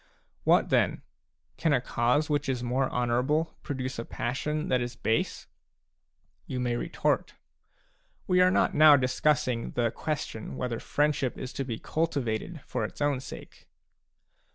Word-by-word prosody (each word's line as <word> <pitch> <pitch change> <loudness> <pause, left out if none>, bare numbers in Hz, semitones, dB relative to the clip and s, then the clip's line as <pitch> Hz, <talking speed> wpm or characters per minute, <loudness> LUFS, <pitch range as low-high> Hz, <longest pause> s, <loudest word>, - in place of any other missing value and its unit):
What - - +4
then? - - +2 0.5
Can 160 -3 +2
a 130 - +4
cause 125 +5 +1
which 145 -1 0
is 125 -2 -1
more 130 +2 0
honourable 125 +7 0
produce 130 -3 -4
a - - -2
passion 150 +7 -2
that 125 -1 +2
is 120 0 -4
base? 110 0 -1 1.0
You 130 - -3
may 120 -1 0
retort: - - -1 0.4
" - - -39
We 180 0 +4
are 180 - +6
not 185 - +2
now 150 -1 +8
discussing 130 -1 +1
the 120 -2 +1
question 140 -6 -4
whether 120 -2 -2
friendship 145 -3 0
is 130 +1 -6
to 135 - -2
be 120 -4 -4
cultivated 150 0 -2
for - - -3
its - - -6
own 145 -2 +1
sake." 130 - -11
130 Hz, 150 wpm, -28 LUFS, 120-150 Hz, 1.0 s, now